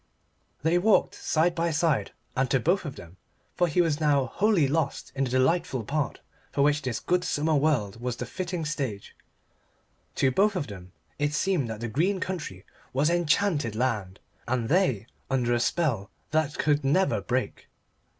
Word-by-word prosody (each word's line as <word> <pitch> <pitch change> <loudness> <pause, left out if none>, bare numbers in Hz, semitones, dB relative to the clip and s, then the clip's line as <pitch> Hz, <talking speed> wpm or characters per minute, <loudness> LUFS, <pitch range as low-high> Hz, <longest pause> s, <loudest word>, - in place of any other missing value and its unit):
They 165 +3 +3
walked 215 +4 +3
side 165 +2 +1
by 170 0 0
side, 150 - +1 0.3
and 130 -1 +1
to 135 - +3
both 175 +9 +1
of 145 - -5
them 85 +2 -12 0.4
for 175 - +2
he 170 +2 +2
was 160 -3 +1
now 145 -3 +3
wholly 185 - +2
lost 150 0 -1
in 135 0 0
the - - -3
delightful 130 0 +1
part 145 +4 -2 0.3
for 140 - +1
which 150 +1 +3
this 125 -5 -2
good 180 0 0
summer 155 +2 0
world 135 -8 +1
was 125 -1 -2
the 125 - -5
fitting 175 +4 -4
stage 135 -9 -4 1.0
to 130 - +2
both 200 +7 +3
of 175 - -1
them 95 -3 -10 0.3
it 145 0 0
seemed 170 -9 +1
that 110 0 -6
the 120 - -2
green 175 - +1
country 150 - -5 0.3
was 145 +5 +2
enchanted 165 - +1
land, 105 -6 -1 0.3
and 120 -2 -1
they 145 - +2 0.2
under 125 -3 +1
a 120 - +2
spell 120 - 0 0.2
that 155 -1 0
could 150 -1 +2
never 135 - +2
break. 120 0 -3
145 Hz, 170 wpm, -27 LUFS, 120-170 Hz, 1.0 s, They